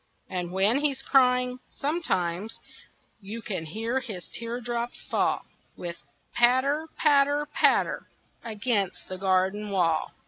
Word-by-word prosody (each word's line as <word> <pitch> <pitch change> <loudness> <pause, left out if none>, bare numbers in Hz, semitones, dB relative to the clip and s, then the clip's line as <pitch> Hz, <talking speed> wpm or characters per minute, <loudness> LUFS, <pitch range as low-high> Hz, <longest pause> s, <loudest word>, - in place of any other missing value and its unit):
And 180 -1 -3
when 200 +8 +3
he's 280 -2 +1
crying, 250 -1 +3
sometimes 215 - -1 0.6
You 215 +4 -7
can 180 -7 -4
hear 225 +9 -1
his 215 -9 -7
teardrops 235 0 -4
fall - - 0 0.3
With 170 -1 -5
a - - -32
patter, 260 +6 +3
patter, 290 0 +4
patter, 295 - +2 0.4
Against 215 -3 -2
the 185 0 -5
garden 190 +2 +1
wall. 170 -5 +1
230 Hz, 115 wpm, -27 LUFS, 190-260 Hz, 0.6 s, patter